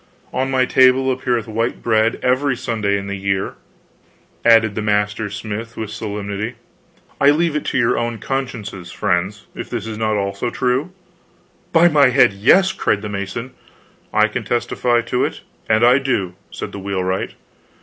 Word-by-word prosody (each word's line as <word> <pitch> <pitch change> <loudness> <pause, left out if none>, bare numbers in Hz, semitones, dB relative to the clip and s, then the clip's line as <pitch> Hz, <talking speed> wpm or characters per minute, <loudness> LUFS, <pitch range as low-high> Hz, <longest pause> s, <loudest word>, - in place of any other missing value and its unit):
"On 130 +1 0
my 130 -1 +2
table 130 +1 +4
appeareth 125 -3 -1
white 115 +2 -2
bread 110 -1 +2
every 130 +1 +1
Sunday 110 -5 -1
in 100 - -5
the 100 0 -4
year," 95 0 -1 0.9
added 115 -2 +5
the 110 - -3
master 105 0 0
smith, 110 +2 -6
with 110 -1 -4
solemnity. 105 +1 -4 0.6
"I 140 - +6
leave 160 +1 +2
it 150 - -2
to - - -1
your 120 -1 +2
own 120 -1 -2
consciences, 110 -8 -4
friends, 95 +4 -1
if - - -7
this - - -4
is 110 -1 -6
not 110 -1 +1
also 100 +3 -2
true?" 130 +8 -1 0.8
"By 170 +1 +6
my 145 -4 +5
head, 125 -5 +4
yes," 185 - +4
cried 105 0 0
the 105 - -4
mason. 100 +5 -5 0.6
"I 110 0 +4
can 115 +3 -4
testify 120 +1 0
it 125 +1 -1 0.3
and 110 +1 +3
I 125 +3 +6
do," 110 -10 -1 0.2
said - - -6
the 100 - -7
wheelwright. 95 -1 -2
115 Hz, 160 wpm, -19 LUFS, 100-130 Hz, 0.9 s, I